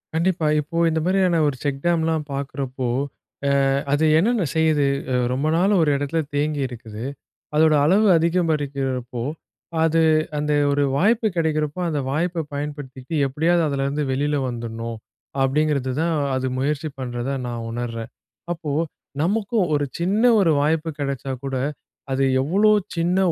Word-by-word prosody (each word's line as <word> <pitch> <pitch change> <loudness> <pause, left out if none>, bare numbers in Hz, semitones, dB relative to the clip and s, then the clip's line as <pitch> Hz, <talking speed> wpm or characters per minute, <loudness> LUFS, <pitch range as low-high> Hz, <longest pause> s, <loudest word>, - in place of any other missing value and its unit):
கண்டிப்பா, 165 -1 +1
இப்போ 155 +3 -4
இந்த 160 0 0
மாரியான 185 -2 +2
ஒரு 145 - +1
செக்டாம்லாம் 160 +2 0
பாக்குறப்போ, 135 -2 -3 0.9
அ - - +1 0.2
அது 150 +2 +3
என்னென்ன 220 +2 +2
செய்யுது? 155 -3 +3 0.3
அ - - +1 0.2
ரொம்ப 135 +4 -1
நாள் 190 +4 +3
ஒரு 150 - +3
எடத்துல 145 +3 -1
தேங்கி 145 0 0
இருக்குது. 115 -1 -8 0.5
அதோட 155 0 +5
அளவு 195 +7 +4
அதிகரிக்கிறப்போ 140 -8 -1 0.6
அது 165 0 +3 0.4
அந்த 150 0 0 0.2
ஒரு 145 0 +2
வாய்ப்பு 220 - +3
கிடைக்கிறப்போ, 155 0 0
அந்த 150 -3 -1
வாய்ப்ப 165 +3 -1
பயன்படுத்திட்டு 145 -2 -6
எப்டியாது 165 +6 +2
அதுலருந்து 140 +1 -1
வெளில 145 +3 0
வந்துறணும் 115 -1 -5 0.5
அப்டிங்கிறதுதான், 150 +2 +1 0.2
அது 130 0 -1
முயற்சி 145 +3 -1
பண்றதா 125 +2 -3
நான் 120 -1 -4
உணர்றேன். 115 -1 -4 0.4
அப்போ 160 -4 -4 0.5
நமக்கும் 205 +2 +1
ஒரு 145 -1 +1
சின்ன 195 +6 +1 0.2
ஒரு 170 -5 +4
வாய்ப்பு 160 +2 +1
கிடைச்சா 140 -1 -3
கூட, 135 - -3 0.6
அது 135 +1 +1 0.2
எவ்ளோ 200 +10 +3 0.2
சின்ன 175 +2 +1
150 Hz, 130 wpm, -22 LUFS, 135-165 Hz, 0.9 s, அதோட